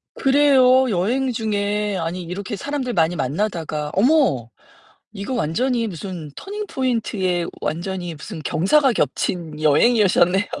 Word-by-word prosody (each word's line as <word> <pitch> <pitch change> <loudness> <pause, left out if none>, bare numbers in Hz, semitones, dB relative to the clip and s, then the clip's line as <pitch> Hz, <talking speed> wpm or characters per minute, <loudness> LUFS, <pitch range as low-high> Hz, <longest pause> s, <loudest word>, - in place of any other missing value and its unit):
그래요, 265 -2 +4
여행 240 +8 0
중에 210 -2 -1
아니 175 +1 -3
이렇게 185 +4 -5
사람들 275 0 -3
많이 170 -1 +2
만나다가 155 0 -2
어머. 235 - +2 0.6
이거 200 +5 -5
완전히 235 - 0
무슨 175 -4 -7
터닝 415 +1 -6
포인트에 210 -9 -1 0.2
완전히 175 +2 -3
무슨 160 +3 -8
경사가 245 - +3
겹친 155 +1 -2
여행이어 205 +8 +4
셨네요. 185 +3 +3
200 Hz, 300 characters per minute, -21 LUFS, 170-250 Hz, 0.6 s, 그래요